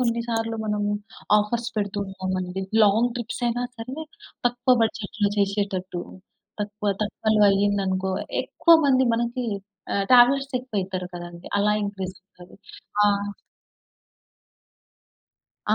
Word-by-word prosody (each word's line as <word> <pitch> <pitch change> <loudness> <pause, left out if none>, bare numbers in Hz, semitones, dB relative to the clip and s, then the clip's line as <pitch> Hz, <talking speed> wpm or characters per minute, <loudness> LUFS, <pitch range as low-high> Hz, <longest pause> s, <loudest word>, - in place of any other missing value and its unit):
కొన్నిసార్లు 230 -1 -1
మనము 210 -1 0 0.5
ఆఫర్స్ 230 +3 -1
పెడుతూ 205 -1 -1
ఉంటామండి, 185 -1 -3 0.2
లాంగ్ 220 +4 +4
ట్రిప్స్ 240 +1 -5
అయినా 240 +1 0
సరే 240 +4 -7 0.5
తక్కువ 245 +1 +3
బడ్జెట్‌లో 215 -1 -1
చేసేటట్టు, 195 -3 -1 0.6
తక్కువ 205 0 -3
తక్కువలో 215 +1 0
అయ్యిందనుకో 195 -1 +1 0.3
ఎక్కువ 335 -1 +4
మంది 260 -1 +4
మనకి 235 +1 -1 0.5
ఆహ్, 200 - +1
ట్రావెలర్స్ 270 +3 +6
ఎక్కువయితారు 190 -7 -3
కదండీ, 175 0 -9
అలా 210 +1 +3
ఇంక్రీజవుతారు. 185 -2 -8 0.5
ఆ! - - +6 2.7
ఆ! - - +6
210 Hz, 100 wpm, -24 LUFS, 190-235 Hz, 2.7 s, ట్రావెలర్స్